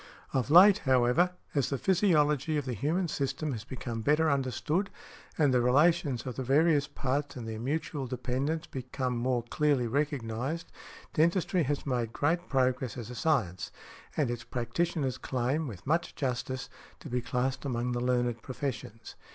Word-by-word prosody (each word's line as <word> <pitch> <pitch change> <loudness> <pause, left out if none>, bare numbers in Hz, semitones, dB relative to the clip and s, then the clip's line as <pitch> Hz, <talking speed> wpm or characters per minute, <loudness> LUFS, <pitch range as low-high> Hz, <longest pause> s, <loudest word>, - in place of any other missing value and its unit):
Of 130 0 0
late, 190 +6 +8
however, 130 +7 +3 0.2
as 140 -4 +1
the 140 - -1
physiology 155 -5 +2
of 145 - -2
the 130 - -2
human 160 - 0
system 140 0 -2
has 110 -5 -4
become 120 -2 -5
better 150 +5 +3
understood, 140 - 0 0.5
and 145 -6 +3
the 125 - +4
relations 145 +1 +3
of 125 -3 -5
the 130 - -2
various 145 +2 +3
parts 140 +2 -2
and 120 -3 -6
their 110 -1 -5
mutual 140 +1 -2
dependence 130 +6 -2
become 130 -3 -3
more 120 0 0
clearly 140 +1 +1
recognized, 140 +3 -2 0.4
dentistry 170 +3 +2
has 145 -1 -1
made 120 -4 -1
great 170 +4 0
progress 130 -2 +1
as 120 -1 -6
a - - -7
science, 115 - 0 0.5
and 140 -6 +1
its 120 -1 -4
practitioners 130 +3 -2
claim, 130 +5 -1
with 95 -6 -9
much 165 +4 0
justice, 130 0 -2 0.3
to - - -10
be 125 0 -1
classed 125 +2 -1
among 125 -3 -1
the 120 0 -1
learned 120 -2 0
professions. 125 -5 -5
135 Hz, 160 wpm, -30 LUFS, 125-150 Hz, 0.5 s, late